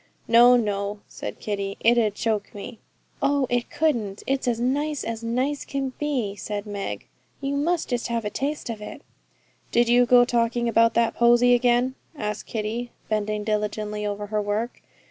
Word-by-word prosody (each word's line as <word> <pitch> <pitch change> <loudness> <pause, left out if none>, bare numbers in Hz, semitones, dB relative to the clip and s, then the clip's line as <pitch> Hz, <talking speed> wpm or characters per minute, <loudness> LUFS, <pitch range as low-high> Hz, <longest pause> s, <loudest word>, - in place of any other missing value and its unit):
'No, 240 +2 +7
no,' 205 -2 -2
said - - -7
Kitty, 200 -1 -3
'it 235 +2 +4
'ud 215 -4 +2
choke 215 -3 -2
me.' 215 +3 -8 0.4
'Oh, 280 -1 +2
it 245 0 0
couldn't; 230 -11 -1
it's 270 -1 -1
as 235 -2 +1
nice 290 +4 0
as 230 0 -4
nice 255 +5 -1
can 270 -2 -3
be,' 255 -9 -1
said 205 0 -5
Meg. 205 -1 -5 0.3
'You 275 0 -2
must 325 +4 0
just 245 -2 -1
have 230 -2 -2
a 210 - -2
taste 280 -1 -3
of 215 -2 -7
it.' 210 - -8 0.7
'Did 240 0 +3
you 245 0 +5
go 245 0 +7
talking 235 0 +1
about 230 0 +4
that 230 -1 +3
Posy 240 +1 +5
again?' 245 +1 +3 0.2
asked 210 -7 -4
Kitty, 225 +2 -3 0.2
bending 215 -1 -1
diligently 210 0 -2
over 205 0 -3
her 210 0 -1
work. 210 +4 -2
235 Hz, 170 wpm, -24 LUFS, 210-250 Hz, 0.7 s, No